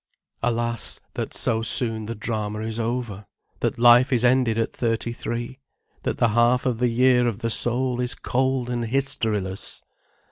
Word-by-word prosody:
Alas, 115 -1 -1
that - - -4
so 115 -2 +1
soon 115 -1 0
the 115 - -4
drama 105 -2 -3
is 110 +1 -4
over; 115 -4 -3 0.3
that - - -1
life 120 +2 +6
is 125 -2 +2
ended 125 -3 +3
at 115 - -1
thirty 115 0 -1
three; 120 +3 -5 0.4
that - - -2
the 120 - +3
half 120 +3 +3
of 125 -3 0
the 125 0 +2
year 125 +1 +3
of 115 -1 -3
the 115 - -1
soul 125 +2 +1
is 125 -1 -2
cold 130 +1 -1
and 120 -1 -2
historiless! 110 -6 -2
120 Hz, 165 wpm, -24 LUFS, 115-125 Hz, 0.4 s, life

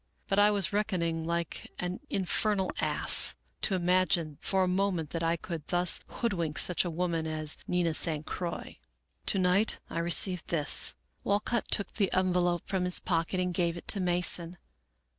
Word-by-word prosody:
But 195 - +1
I 205 +1 +6
was 200 -1 +1
reckoning 170 -6 -1
like 170 -1 -4
an 180 +1 -4
in 190 - -2
fernal 195 0 0
ass, - - +2 0.3
to 195 - +2
imagine 180 -4 0
for 190 -1 +1
a - - 0
moment 180 -4 -1
that 165 - -3
I 165 +1 0
could 165 -2 -7
thus 175 0 +3
hood 235 -3 -2
wink 165 -4 -3
such 180 - +4
a 175 - -3
woman 165 -1 -2
as 155 -1 0
Nina 175 -2 0
San 155 -1 +1
Croix. 170 +2 -6 0.2
" 70 +4 -47
To - - +3
night 185 +4 +2
I 165 - -3
received 175 +1 +2
this." 150 -4 +2 0.3
Walcott 205 +3 -1
took 200 - +1
the 200 -3 0
envelope 180 -2 +1
from 190 -2 -2
his 180 - +5
pocket 170 +1 -1
and 180 -1 -1
gave 170 -1 -1
it - - -11
to 200 - +4
Mason. 175 -1 +2
180 Hz, 180 wpm, -29 LUFS, 165-190 Hz, 0.3 s, I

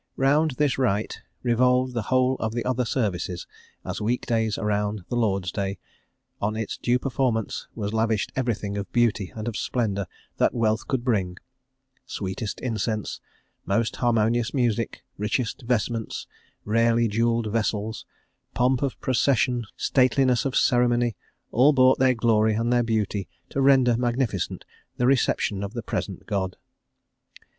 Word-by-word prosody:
Round 145 +4 +3
this 145 -3 +1
rite 110 -5 0 0.2
revolved 125 +1 +2
the 120 - -1
whole 130 0 +3
of 110 0 -2
the 120 0 -2
other 125 -1 0
services, 90 -7 -2 0.4
as - - -4
week 120 +4 -1
days 110 -2 0
around 105 -1 -1
the - - -2
Lord's 100 -6 0
Day; 100 0 -3 0.6
on 105 +2 0
its 110 -1 -3
due 125 +1 +2
performance 125 -4 -1
was 105 -1 -3
lavished 110 -2 0
everything 110 -5 -1
of 100 - -6
beauty 110 -7 +1
and 110 +1 -5
of 115 - -3
splendour 100 -4 -1 0.3
that - - +2
wealth 110 -2 +1
could 130 -3 -1
bring; 95 -8 0 0.7
sweetest 100 +1 -4
incense, 110 -3 -2 0.4
most 110 +3 0
harmonious 120 +1 +1
music, 115 -3 0 0.2
richest 110 +5 -1
vestments, 115 -2 -1 0.4
rarely 115 +2 +3
jewelled 115 0 0
vessels, 110 -1 -1 0.5
pomp 125 +1 +2
of 140 -3 -2
procession, 125 -2 +1
stateliness 130 -1 +3
of 135 - -1
ceremony, 120 -2 +3 0.4
all 135 +5 +5
brought 130 -1 +5
their 130 -1 +4
glory 110 -2 +3
and 115 +2 +1
their 120 - +4
beauty 105 -4 -1 0.2
to 140 - -1
render 130 -3 +5
magnificent 120 0 -1 0.3
the 125 - +1
reception 120 -6 +2
of 100 +2 -5
the 120 -2 -4
present 100 -2 -4
God. 95 -3 -2
115 Hz, 140 wpm, -25 LUFS, 105-125 Hz, 0.7 s, all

